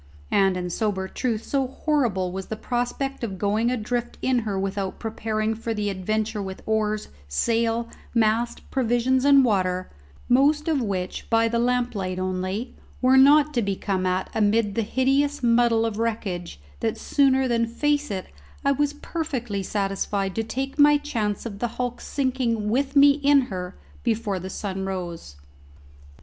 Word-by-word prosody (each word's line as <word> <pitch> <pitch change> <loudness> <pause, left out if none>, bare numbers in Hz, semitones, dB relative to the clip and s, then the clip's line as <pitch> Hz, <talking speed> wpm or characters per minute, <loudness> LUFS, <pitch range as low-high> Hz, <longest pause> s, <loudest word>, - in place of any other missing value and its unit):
And, 195 -2 +3
in 180 -1 -3
sober 190 -1 -1
truth, 225 +1 -2
so 270 -2 0
horrible 245 - 0
was 190 +1 -5
the 220 - -4
prospect 245 +4 -3
of 195 -5 -3
going 210 +4 +1
adrift 240 0 -2
in 260 -1 +2
her 210 -4 -2
without 195 0 -3
preparing 220 -1 -2
for 225 0 -4
the 205 -1 -1
adventure 215 +3 -2
with 190 -1 -7
oars, 215 -1 0 0.2
sail, 230 - 0 0.2
mast, 230 +1 +1
provisions, 255 +1 +1
and 280 -2 +7
water 185 -4 0 0.4
most 290 +5 +3
of 310 -4 +1
which, 190 -5 -3
by 230 0 +3
the 235 +1 0
lamplight 240 -7 0
only, 185 +5 -3 0.2
were 260 +1 +4
not 290 +3 +6
to 240 - +1
be 200 -2 -1
come 185 -1 -1
at 185 +1 0
amid 210 0 +2
the 230 - 0
hideous 270 +5 +1
muddle 230 -1 +3
of 220 -1 -3
wreckage 195 - -3 0.2
that 220 - -1
sooner 265 -2 +2
than 230 -1 +1
face 295 +5 0
it 190 -2 -3 0.4
I 280 - +4
was 290 +1 +1
perfectly 260 - -3
satisfied 195 0 -1
to 225 - -1
take 270 +5 -4
my 295 0 +7
chance 225 -9 -2
of 200 -4 -6
the 240 - 0
hulk 245 -1 -3
sinking 250 -6 -1
with 275 +3 0
me 285 0 +8
in 285 0 +4
her 180 0 -5 0.2
before 220 -5 -1
the 185 +2 -6
sun 190 0 -4
rose. 175 - -5
225 Hz, 160 wpm, -24 LUFS, 195-260 Hz, 0.4 s, me